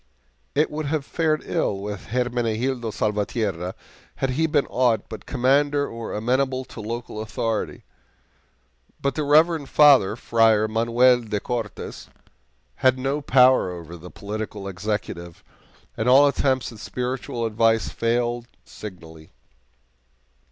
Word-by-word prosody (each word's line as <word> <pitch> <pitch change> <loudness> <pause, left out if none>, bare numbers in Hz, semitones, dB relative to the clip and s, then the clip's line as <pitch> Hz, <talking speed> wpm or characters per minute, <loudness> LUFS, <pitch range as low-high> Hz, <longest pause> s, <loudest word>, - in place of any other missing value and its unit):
It 150 +2 +2
would 150 0 -3
have 145 -1 -1
fared 155 -2 0
ill 100 - -1
with 100 0 -6
Hermenegildo 120 +1 -1
Salvatierra 105 -4 -2 0.4
had 135 - -1
he 160 +5 +1
been 145 -2 +2
aught 120 -3 +1
but 110 - -9
Commander 145 +2 +2
or 115 -1 -6
amenable 130 +4 0
to 115 - -10
local 115 0 -5
authority. 110 0 -3 1.2
But 140 -1 -1
the 155 - -2
reverend 155 0 +3
father, 140 -9 +6
Friar 110 -2 +3
Manuel 115 +3 +3
de 105 -3 -3
Cortes, 115 -1 -5 0.7
had 130 0 +3
no 135 +3 -1
power 130 -6 +5
over 85 -1 -8
the 85 +1 -11
political 105 -1 -6
executive, 90 -3 -5 0.5
and 110 +3 0
all 135 +3 +7
attempts 130 -2 0
at 110 - -12
spiritual 125 -1 -3
advice 115 0 +2
failed 120 +1 -1 0.2
signally. 80 -6 -11
120 Hz, 125 wpm, -23 LUFS, 105-130 Hz, 1.2 s, all